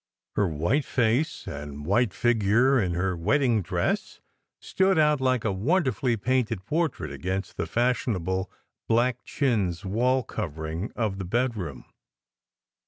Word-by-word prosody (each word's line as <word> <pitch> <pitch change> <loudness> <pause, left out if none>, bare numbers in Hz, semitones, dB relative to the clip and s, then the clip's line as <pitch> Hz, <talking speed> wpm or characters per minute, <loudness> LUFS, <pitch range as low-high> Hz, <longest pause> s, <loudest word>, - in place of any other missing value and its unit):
Her 105 - +2
white 85 - 0
face 125 +7 0
and 75 0 -7
white 105 +5 +2
figure 120 +4 +3
in 90 -3 -1
her 90 +1 0
wedding 120 - +2
dress 85 - -2 0.4
stood 190 -1 +1
out 150 -2 +3
like 130 -3 +1
a 110 - +2
wonderfully 125 - +1
painted 115 -3 0
portrait 165 +4 -1
against 95 +2 -4
the - - -3
fashion 120 -1 +1
able 95 +2 -2 0.4
black 120 +2 +1
chintz 105 - 0
wall 125 +6 +1
covering 80 -2 -4
of 105 -4 -1
the 95 - -4
bedroom. 105 - -2
110 Hz, 130 wpm, -26 LUFS, 95-130 Hz, 0.4 s, figure